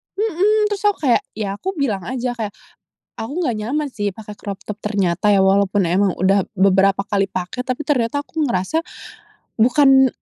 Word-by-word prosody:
"mhm," 420 +1 +1
terus 410 0 -3
aku 410 - +1
kayak - - +3
ya 205 -2 -4
aku 380 +1 -4
bilang 225 - -1
aja 250 0 -2
kayak, 220 -4 -5 0.6
"Aku 225 - -6
nggak 265 -10 0
nyaman 290 +6 -1
sih 205 -4 -2
pakai 210 +1 -10
crop 200 -1 -7
top 210 - -4
ternyata 200 -2 +1
ya, 200 - +4
walaupun 195 -1 +3
emang 190 +2 +2
udah 195 +2 +3
beberapa 195 +1 +4
kali 195 -2 0
pakai, 185 +7 -4
tapi 255 +4 -4
ternyata 255 -1 +1
aku 320 -1 -2
ngerasa 245 - 0 0.8
bukan 265 +3 +5
220 Hz, 170 wpm, -20 LUFS, 195-280 Hz, 0.8 s, bukan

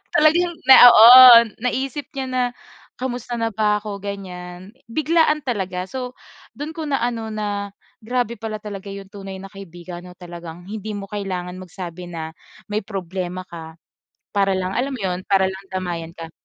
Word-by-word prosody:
talagang 345 +2 +4
na 265 -1 +10
oo, 225 -1 +8 0.6
naisip 265 +2 -2
niya 270 -1 -3
na 255 -1 0 0.6
kumusta 245 -1 -4
na 230 0 0
ba 210 0 +1
ako 205 -1 -6
ganiyan. 185 -1 -8 0.2
Biglaan 310 +2 +2
talaga. 190 -7 -3
So 255 -1 -5 0.4
do'n 290 +2 -5
ko 320 - -5
na 275 -3 0
ano 230 -2 -2
na 205 -1 -4 0.3
grabe 240 0 -2
pala 220 0 -5
talaga 200 -1 -8
'yong 195 -1 -10
tunay 195 -2 -8
na 195 - -10
kaibigan 175 -2 -10
'no, 180 - -11
talagang 175 -1 -10
hindi 215 0 -6
mo 200 - -6
kailangan 185 -3 -4
magsabi 180 -1 -8
na 160 -1 -5 0.4
may 215 +1 0
problema 185 -2 -5
ka 160 -2 -10 0.6
para 195 -1 +2
lang 185 0 -2
alam 270 +3 -1
mo 255 - -7
'yon 185 -1 -2
para 190 -1 +3
lang 190 +1 -10
damayan 170 -3 -4
ka. 165 -1 -8
200 Hz, 165 wpm, -21 LUFS, 180-240 Hz, 0.6 s, na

